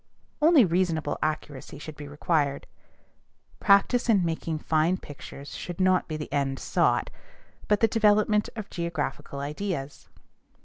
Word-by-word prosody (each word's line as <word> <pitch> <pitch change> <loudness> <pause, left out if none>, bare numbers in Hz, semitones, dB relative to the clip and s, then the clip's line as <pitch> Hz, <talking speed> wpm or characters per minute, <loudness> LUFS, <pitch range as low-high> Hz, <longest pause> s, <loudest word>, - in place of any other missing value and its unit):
Only 305 -6 +6
reasonable 170 -4 0
accuracy 150 -3 -4
should 150 +1 -9
be 145 0 -9
required. 145 -1 0 0.9
Practice 220 +5 +4
in 200 -6 +4
making 165 -1 -2
fine 160 +3 +1
pictures 140 -3 -10
should 175 0 -6
not 185 0 +3
be 155 - -4
the 150 -2 -7
end 135 -2 0
sought, - - +1 0.6
but 210 -1 +2
the 225 - +6
development 210 -1 +3
of 215 -3 -6
geographical 170 -4 -4
ideas. 145 -1 -5
165 Hz, 130 wpm, -27 LUFS, 145-200 Hz, 0.9 s, Only